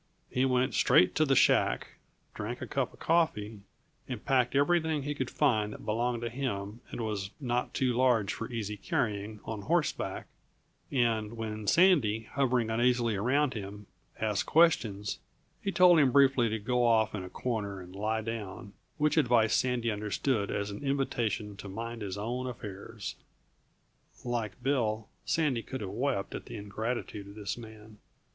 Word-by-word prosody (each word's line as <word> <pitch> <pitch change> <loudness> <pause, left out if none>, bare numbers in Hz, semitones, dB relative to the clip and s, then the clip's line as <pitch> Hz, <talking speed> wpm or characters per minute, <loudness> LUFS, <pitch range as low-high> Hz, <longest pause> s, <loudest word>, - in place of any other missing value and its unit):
He 130 +1 +2
went 130 +1 +2
straight 90 - +5
to 155 - +3
the 135 -2 +3
shack, - - +3 0.4
drank 115 +4 -5
a - - -4
cup 135 -3 -1
of - - -18
coffee, 115 -11 +1 0.5
and 125 -5 -5
packed 130 -2 +2
everything 160 0 +2
he 145 +1 -2
could 130 -3 -3
find 110 -8 +2
that - - -10
belonged 120 +2 0
to 120 - -1
him 115 -4 -4
and - - -5
was 105 -4 -2
not 125 -3 -2
too 130 -2 +2
large 120 -5 +3
for 115 +2 -6
easy 105 -3 -3
carrying 105 0 -2
on 110 -2 -4
horseback; 165 - -1 0.7
and 115 -4 +1
when 110 -2 -5
Sandy, 140 - +4
hovering 125 -4 +1
uneasily 120 -1 +2
around 130 +7 +2
him, 105 -1 -7 0.3
asked 105 -2 0
questions, 110 -12 +3 0.4
he 200 - -1
told 180 -3 +6
him 135 -4 +4
briefly 135 -3 +5
to 110 - -1
go 125 +3 0
off 110 -2 +3
in 100 -3 -4
a 90 - -7
corner 100 -2 -3
and 90 0 -11
lie 110 +2 -1
down; 105 -3 -6 0.2
which 150 +1 +2
advice 120 -6 +4
Sandy 125 -2 +1
understood 105 +2 -1
as 100 0 -2
an 100 - -7
invitation 115 -7 -1
to 100 - -8
mind 115 +3 -5
his 100 -1 -4
own 120 +5 -3
affairs. 110 -3 -7 1.1
Like 120 -2 -3
Bill, 110 -6 0 0.2
Sandy 145 -8 +1
could 130 +3 -6
have 95 -2 -4
wept 120 -2 -1
at - - -6
the - - -7
ingratitude 105 0 -4
of 100 - -11
this 105 -2 -3
man. 110 -2 -12
115 Hz, 165 wpm, -30 LUFS, 105-130 Hz, 1.1 s, told